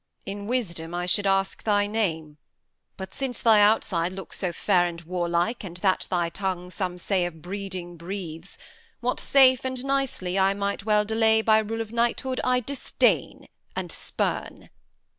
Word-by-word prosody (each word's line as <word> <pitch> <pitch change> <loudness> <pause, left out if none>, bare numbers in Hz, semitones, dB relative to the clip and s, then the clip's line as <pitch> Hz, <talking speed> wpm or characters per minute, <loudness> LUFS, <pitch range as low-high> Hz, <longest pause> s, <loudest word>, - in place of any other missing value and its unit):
Edm. - - -4
In 200 0 -6
wisdom 175 -9 -2
I 175 0 -2
should 200 +3 +2
ask 195 0 +1
thy 205 -1 +2
name; 160 -8 -2 0.6
But 190 0 -7
since 265 -2 -3
thy 220 -3 +5
outside 185 -4 +2
looks 195 0 -7
so 180 -3 -1
fair 175 +1 +2
and 170 -1 -6
warlike, 175 +5 -1
And 175 -3 -7
that 190 0 +1
thy 175 -2 0
tongue 180 -1 -3
some 180 0 -3
say 185 +1 0
of 160 -3 -11
breeding 185 -2 -5
breathes, 170 -1 -7 0.4
What 250 +1 -1
safe 260 -2 +5
and 260 0 -3
nicely 265 -9 0
I 195 +1 +3
might 200 0 -2
well 210 -1 +3
delay 220 0 +3
By 220 -1 +5
rule 225 +1 -2
of 220 -1 -6
knighthood, 240 +2 0
I 250 0 +2
disdain 275 +3 0 0.3
and - - -4
spurn. - - -3
195 Hz, 165 wpm, -26 LUFS, 175-225 Hz, 0.6 s, thy